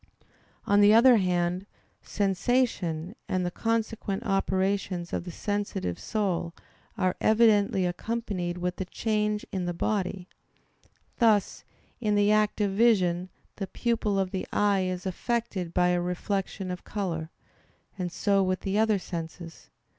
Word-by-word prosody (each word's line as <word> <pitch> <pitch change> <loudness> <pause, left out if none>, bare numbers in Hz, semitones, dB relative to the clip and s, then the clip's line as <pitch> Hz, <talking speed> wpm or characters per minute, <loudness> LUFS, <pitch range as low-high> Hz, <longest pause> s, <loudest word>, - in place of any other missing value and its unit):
On 205 0 +4
the 205 +1 +7
other 240 +1 +7
hand, 180 0 0 0.3
sensation 195 -4 0
and 185 -1 0
the 175 - -2
consequent 225 -1 -2
operations 195 -2 0
of - - -2
the 175 - -6
sensitive 205 - -3
soul 180 -5 -2 0.4
are 185 -2 +1
evidently 215 -3 +4
accompanied 180 -2 -3
with 180 +1 -2
change 210 -1 -1
in 185 -2 -2
the 175 -1 -3
body; 185 -1 -2 0.9
thus 220 -4 +3 0.4
in 210 -3 +1
the 205 0 +4
act 215 0 +2
of 200 -1 +1
vision, 185 -5 +2 0.3
the 195 - -3
pupil 220 -1 -1
of 190 -1 0
the 190 - -3
eye 200 -2 +2
is 185 0 -3
affected 190 -2 -2
by 180 +1 +3
a 175 0 +1
reflection 185 +1 -3
of 180 - -6
color: 170 -6 -3 0.7
and 180 -3 -3
so 200 +1 +2
with 185 -1 0
the 195 +2 0
other 220 -1 +3
senses. 170 -2 -7
195 Hz, 135 wpm, -27 LUFS, 180-210 Hz, 0.9 s, the